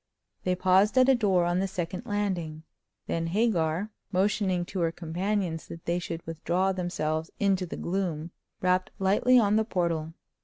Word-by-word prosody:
They 180 0 +2
paused 190 +5 +3
at 255 +1 +6
a - - +7
door 195 -8 +2
on 175 +1 +1
the 195 - 0
second 180 -1 -4
landing. 180 -7 -2 0.4
Then 165 0 -2
Hagar, 185 -1 +1 0.2
motioning 190 -2 +1
to 190 - -5
her 165 -1 +1
companions 175 +1 -2
that 165 - -10
they 170 +1 0
should 170 -1 -6
withdraw 170 +4 0
themselves 160 -3 -2
into 195 -2 +1
the - - -6
gloom, 170 -3 -2 0.3
rapped 185 0 +2
lightly 205 +7 +4
on 210 -2 +4
the 220 - +3
portal. 170 -6 -1
185 Hz, 160 wpm, -28 LUFS, 165-200 Hz, 0.4 s, a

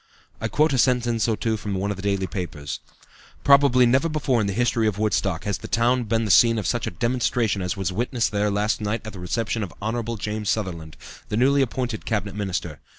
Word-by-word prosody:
I 110 - 0
quote 150 +8 +2
a 130 - +1
sentence 120 -2 +2
or 110 -2 0
two 110 -1 -1
from 105 -2 -4
one 100 +2 -1
of - - -3
the 95 - -8
daily 100 -1 0
papers: 75 - -5 0.6
"Probably 140 -3 +6
never 130 +7 +3
before 145 -6 +1
in 105 - 0
the 100 - -1
history 115 0 +1
of 105 -2 -1
Woodstock 100 -5 0
has 100 -2 -2
the - - -8
town 120 +2 +2
been 115 +1 0
the 105 - +1
scene 115 +4 +6
of 105 - -2
such 120 -2 -1
a 85 - -6
demonstration 120 -3 0
as 90 +3 -2
was 95 -1 -2
witnessed 120 +3 0
there 105 0 +1
last 105 +2 0
night 105 +2 -2
at 110 - -7
the 95 - -9
reception 110 +5 -2
of 100 -5 -4
Hon. 115 +1 -3
James 105 0 -3
Sutherland, 85 -7 -3 0.3
the 105 - -1
newly 140 +3 +4
appointed 125 -3 -2
Cabinet 105 -3 -1
Minister. 95 -6 -3
110 Hz, 220 wpm, -24 LUFS, 100-120 Hz, 0.6 s, Probably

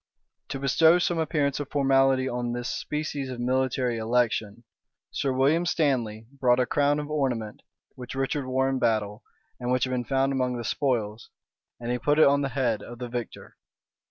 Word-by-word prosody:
To 135 - -3
bestow 160 +5 +4
some 175 -1 0
appearance 150 -3 0
of 145 -1 -5
formality 135 -1 +3
on 120 -1 -2
this 120 0 -3
species 150 -3 -3
of 125 -2 -6
military 125 -1 0
election, 115 -1 0 0.5
Sir 135 - -1
William 140 +6 +2
Stanley 130 -11 0
brought 125 -1 +3
a 125 - +3
crown 145 +3 +2
of 150 0 -5
ornament, 125 -8 -2 0.3
which 125 0 -9
Richard 135 0 -2
wore 130 +1 +1
in 135 -1 -1
battle, 110 -1 0 0.4
and 125 0 -2
which 125 -1 +2
had 130 - -1
been 125 -1 -1
found 135 +1 +1
among 125 -2 -1
the 120 - -5
spoils; 115 -3 -2 0.5
and 120 0 -4
he 125 - -1
put 145 +3 +1
it 155 - +7
on 140 0 +4
the 140 - -1
head 125 -5 0
of 120 +3 -10
the 125 0 -6
victor. 120 -1 -7
130 Hz, 185 wpm, -26 LUFS, 120-140 Hz, 0.5 s, it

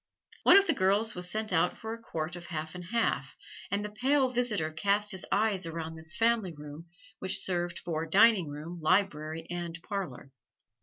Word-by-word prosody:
One - - +8
of 400 - +6
the - - +3
girls 205 +3 +2
was 180 0 -4
sent 215 -1 -2
out 175 +1 +2
for 220 0 -5
a 230 - -9
quart 160 -5 -4
of 175 0 -9
half 155 -2 -4
and 180 -1 -8
half, 230 +5 0 0.3
and 200 +1 -1
the 210 - -6
pale 265 +4 +2
visitor 225 -10 0
cast 200 +5 +1
his 190 -2 -6
eyes 205 -4 +2
around 165 -1 -5
this 160 +1 -6
family 225 -7 +2
room, 150 +3 -9 0.3
which 190 0 +1
served 175 -2 -1
for 165 -1 -3
dining 200 0 +5
room, 155 +4 -7
library 160 -2 +1
and 170 -2 -4
parlor. 165 -9 -5
180 Hz, 185 wpm, -30 LUFS, 160-210 Hz, 0.3 s, One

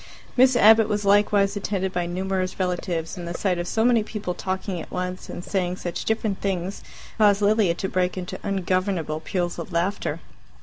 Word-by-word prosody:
Miss 255 0 +5
Abbott 220 -1 +6
was 210 -1 -1
likewise 200 0 +3
attended 190 -2 -2
by 175 -1 -1
numerous 185 +1 -2
relatives, 180 -2 -2
and 170 - -6
the 170 - -4
sight 185 -3 0
of 175 - -3
so 220 +4 +1
many 240 -2 +4
people 210 -4 -4
talking 185 -1 -3
at - - -10
once 180 0 -4
and 175 - -6
saying 180 -2 -1
such 175 -2 -5
different 220 -3 -1
things 190 -1 -2 0.4
caused 205 -1 +4
Lilia 205 -4 +3
to 190 - -3
break 185 0 0
into 180 -1 -5
ungovernable 185 -4 -1
peals 175 +2 -2
of - - -6
laughter. 175 +4 -1
190 Hz, 180 wpm, -24 LUFS, 180-205 Hz, 0.4 s, Abbott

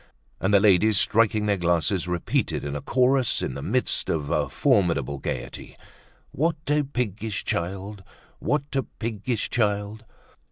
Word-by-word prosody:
And 95 - 0
the 100 - +6
ladies, 105 +1 +4
striking 110 -1 +2
their 100 -1 +1
glasses, 85 +1 +1
repeated 90 -1 -1
in 70 0 -4
chorus 130 0 +2
in 65 - -2
the - - -6
midst - - 0
of 75 -2 -1
a 75 -4 +1
formidable 70 -4 +1
gaiety: - - -6 0.5
"What 160 +4 +1 0.2
a 150 0 +3
piggish 110 -6 -3
child! 95 +3 -3 0.4
What 145 -1 0
a 135 - +2
piggish 115 -1 -4
child!" 105 -1 -1
105 Hz, 135 wpm, -25 LUFS, 85-115 Hz, 0.5 s, the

